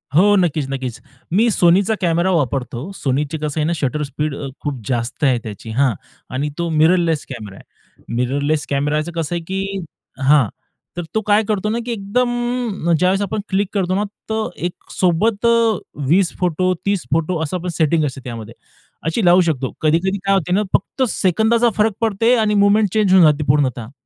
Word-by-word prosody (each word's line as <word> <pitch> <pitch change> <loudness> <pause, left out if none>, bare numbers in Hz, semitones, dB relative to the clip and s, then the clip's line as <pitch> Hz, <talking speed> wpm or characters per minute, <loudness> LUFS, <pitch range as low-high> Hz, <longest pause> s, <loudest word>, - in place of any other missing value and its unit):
हो, 205 +5 +5
नक्कीच, 165 -6 +1
नक्कीच, 130 -4 -4 0.3
मी 220 +6 +4
SONYचा 190 +3 +3
कॅमरा 170 +1 +2
वापरतो. 135 -6 -1 0.2
SONYची 145 +2 -1
कसं 150 +1 -2
आहे 150 - +1
ना, 170 - +1
शटर 150 0 -2
स्पीड 150 +1 -3
अ, 140 - -5
खूप 140 -5 -4
जास्त 120 +3 -2
आहे 130 -3 +4
त्याची. 110 +1 -8
हां, 130 +1 +2 0.4
आणि 145 +3 -1
तो 170 0 -1
मिररलेस 165 0 +2
कॅमेरा 105 -7 -8
आहे. - - -23
मिररलेस 140 +5 0
कॅमेराच 150 +3 0
कसं 165 0 -2
आहे, 170 - -2
की 195 +1 -3 0.5
हां, 145 -6 +5 0.5
तर 175 - -2
तो 220 - +2
काय 210 +1 +4
करतो 210 -1 0
ना, 225 - -1
की 245 - -3
एकदम 240 -2 -1
ज्यावेळेस 185 +4 +2
आपण 205 +2 -2
क्लिक 200 +1 +1
करतो 185 -3 0
ना, 205 - +1 0.3
तर 220 0 -1 0.2
एकसोबत 185 +4 -1 0.6
20 180 +2 +3
फोटो, 185 +1 +1
30 200 -3 0
फोटो 165 +2 0
असं 160 +4 -2
आपण 180 +1 -5
सेटिंग 160 -1 +2
असते 135 -1 -5
त्यामध्ये 115 -3 -7 0.5
अशी 180 +6 0
लावू 175 +1 +6
शकतो. 140 -7 -1
कधी-कधी 170 +6 +1
काय 195 - +3
होतं 180 -2 0
ना, 210 - +2
फक्त 260 +7 0
सेकंदाचा 220 +6 +2
फरक 215 0 +3
पडते, 225 +2 +2
आणि 215 -3 +1
मूव्हमेंट 205 +1 +4
चेंज 210 -4 +3
होऊन 190 -2 +7
जाते 150 0 +3
पूर्णतः. 130 -5 +1
170 Hz, 175 wpm, -19 LUFS, 145-200 Hz, 0.6 s, होऊन